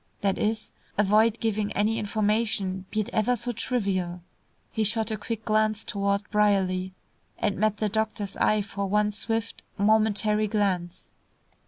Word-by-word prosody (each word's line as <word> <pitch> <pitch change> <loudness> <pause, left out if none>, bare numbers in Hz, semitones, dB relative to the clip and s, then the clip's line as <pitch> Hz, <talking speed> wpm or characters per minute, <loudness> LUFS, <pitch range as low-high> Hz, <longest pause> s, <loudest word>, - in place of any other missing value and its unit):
That 195 -1 +1
is, 220 +1 -1 0.3
avoid 215 +2 +4
giving 215 -2 -1
any 215 +2 +1
information, 205 -3 0
be 215 - 0
it 210 - -5
ever 220 +3 +2
so 245 +1 -3
trivial." 195 -7 -2 0.5
He 220 - 0
shot 220 +1 +1
a - - 0
quick 220 +1 -5
glance 215 0 +1
toward 200 0 -1
Brierly, 190 -3 +2 0.4
and 205 -1 -1
met 215 0 +2
the 215 - 0
doctor's 215 -1 -2
eye 215 -1 +2
for 200 -1 -4
one 210 +1 +2
swift, 225 +2 -2 0.2
momentary 215 0 +3
glance. 185 -4 -1
210 Hz, 145 wpm, -26 LUFS, 200-220 Hz, 0.5 s, avoid